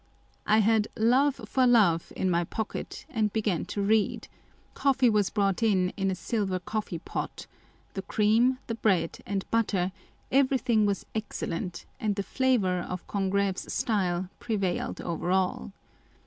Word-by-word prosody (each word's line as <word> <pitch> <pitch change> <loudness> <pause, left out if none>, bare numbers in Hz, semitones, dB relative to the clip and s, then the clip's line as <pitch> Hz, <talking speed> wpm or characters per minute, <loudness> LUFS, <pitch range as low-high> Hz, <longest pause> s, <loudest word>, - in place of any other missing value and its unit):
I 215 +1 +5
had 220 0 +3
Love 255 +5 +3
for 260 -1 +2
Love 200 -9 +4
l - - -5
in - - +3
my 170 0 +2
pocket, 220 +5 -5
and 215 -2 0
began 210 -6 0
to 200 - -3
read; 215 +1 +1 0.5
coffee 270 -3 +3
was 210 -2 +2
brought 200 -2 0
in 190 -5 +3
in 195 -1 -1
a 190 - -1
silver 190 +1 -1
coffee 210 -1 -4
pot; 165 - -5 0.5
the 195 - -3
cream, 225 +6 +2
the 230 - -3
bread 190 -7 +1
and 195 -1 -2
butter, 200 -5 +1 0.4
everything 255 -5 +3
was 200 -1 -1
excellent, 180 -5 -4
and 215 -5 0
the 200 - -2
flavour 215 -8 +1
of 180 +1 -5
Congreve's 195 -1 -1
style 185 -5 0
prevailed 200 -6 -2
over 170 0 -3
all. 180 - 0
205 Hz, 150 wpm, -28 LUFS, 185-225 Hz, 0.5 s, I